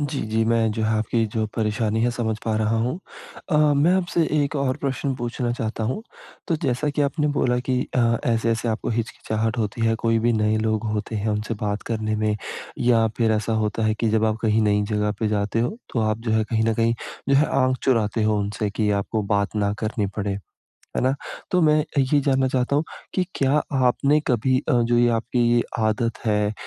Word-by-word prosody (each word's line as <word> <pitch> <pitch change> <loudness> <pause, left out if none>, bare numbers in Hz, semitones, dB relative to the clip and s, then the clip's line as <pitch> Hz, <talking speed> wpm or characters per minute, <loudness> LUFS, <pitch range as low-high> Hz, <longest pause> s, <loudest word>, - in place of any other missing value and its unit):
जी, 145 -1 -2
जी, 110 +1 +1
मैं 115 -1 +2
जो 110 - -3
है 110 - +1
आपकी 115 +1 0
जो 110 -1 0
परेशानी 110 0 0
है, 120 - +2
समझ 110 -3 -2
पा 110 -1 0
रहा 110 +1 +1
हूँ। 125 +9 -1 0.5
अ, 150 - +3 0.2
मैं 155 +6 +4
आपसे 175 -2 +1 0.2
एक 145 +1 -2
और 135 -2 0
प्रश्न 135 0 -2
पूछना 120 -1 -3
चाहता 110 -1 -3
हूँ, 130 - -2 0.5
तो 165 - +2
जैसा 135 +2 0
कि 145 0 0
आपने 150 +2 0
बोला 125 -1 +2
कि 125 -1 +2 0.2
अ, 115 -1 +3
ऐसे-ऐसे 115 0 +1
आपको 110 - -2
हिचकिचाहट 110 0 -2
होती 110 +1 -2
है, 115 - +3
कोई 115 0 +1
भी 120 +1 +2
नए 110 -1 +1
लोग 110 0 0
होते 110 +1 -3
हैं, 105 +1 -2
उनसे 105 +2 -1
बात 105 0 -1
करने 110 -1 -1
में 105 -1 0 0.4
या 115 -2 +3
फिर 115 -2 +2
ऐसा 110 +1 0
होता 105 +1 -2
है 110 - +2
कि 115 - +2
जब 110 0 +2
आप 110 0 +1
कहीं 110 0 +2
नई 105 -1 +2
जगह 105 0 +1
पे 110 - +1
जाते 105 +1 0
हो, 150 - -1 0.2
तो 115 - +2
आप 110 0 0
जो 115 -1 -3
है 110 0 +2
कहीं 110 0 0
न 110 - +2
कहीं 115 +1 +2 0.3
जो 140 - +4
है, 150 +3 +4
आँख 130 -1 +1
चुराते 115 -4 +1
हो 110 -1 +2
उनसे 100 +1 -2
कि 105 0 0
आपको 110 0 -2
बात 100 +1 0
ना 100 -1 +1
करनी 110 -1 -1
पड़े। 100 -1 -2 0.6
है - - +2
ना? 130 - +3 0.4
तो 180 -2 +3
मैं 155 -1 +4
अ, 145 - -3
ये 135 +2 +3
जानना 135 -1 +2
चाहता 130 +1 0
हूँ, 150 - +2 0.3
कि 185 - +1
क्या 140 +2 +2 0.3
आपने 140 +4 +3
कभी 130 +2 +2
अ, - - +3
जो 120 +1 +2
ये 120 0 +4
आपकी 120 +2 -2
ये 120 - +4 0.2
आदत 110 +1 0
है 105 -1 +1
115 Hz, 220 wpm, -23 LUFS, 110-130 Hz, 0.6 s, मैं